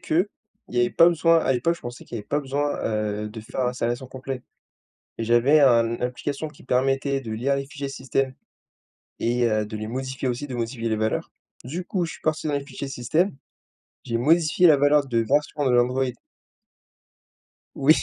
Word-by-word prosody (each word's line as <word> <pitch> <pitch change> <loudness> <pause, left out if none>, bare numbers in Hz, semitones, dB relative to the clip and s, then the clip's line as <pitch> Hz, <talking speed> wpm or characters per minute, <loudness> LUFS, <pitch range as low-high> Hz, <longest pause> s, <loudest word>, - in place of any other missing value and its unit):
qu'il 175 +5 +1 0.4
y 120 - 0
avait 120 - +2
pas 165 - +6
besoin 165 0 +4
à 135 - +2
l'époque, 150 +7 +1
je - - -17
pensais 120 0 -8
qu'il - - -7
y - - -3
avait 105 - -9
pas 145 - 0
besoin, 145 +1 -1
heu, 105 -1 -1
de 110 +1 -8
faire 125 +4 -3
l'installation 125 +1 -2
complet 130 -1 -6 0.8
et 115 - -2
j'avais 120 +6 +4
un 115 -4 +4
application 140 +5 -3
qui 150 - -18
permettait 135 +2 +1
de 115 -4 -6
lire 135 +5 0
les 140 0 -3
fichiers 140 -1 -6
système 135 0 -1 0.9
et 120 +1 +2
heu, 110 -2 +1
de 110 +1 -6
les 110 - -4
modifier 130 +2 -4
aussi, 125 +4 -3
de 130 - -5
modifier 115 0 -2
les 110 - 0
valeurs. 110 0 -1 0.3
Du 165 +9 -4
coup, 180 -1 -1
je - - -6
suis - - -13
parti 155 0 0
dans 145 - 0
les 140 -1 -2
fichiers 140 - -6
système. 135 +9 0 0.7
J'ai 115 - -1
modifié 160 +6 +4
la 155 -3 +7
valeur 145 0 +4
de 115 -3 +1
version 145 +6 +1
de 130 - +3
l'Android. 125 +2 +3 1.7
Oui! 140 +3 +6
130 Hz, 195 wpm, -24 LUFS, 120-145 Hz, 1.7 s, la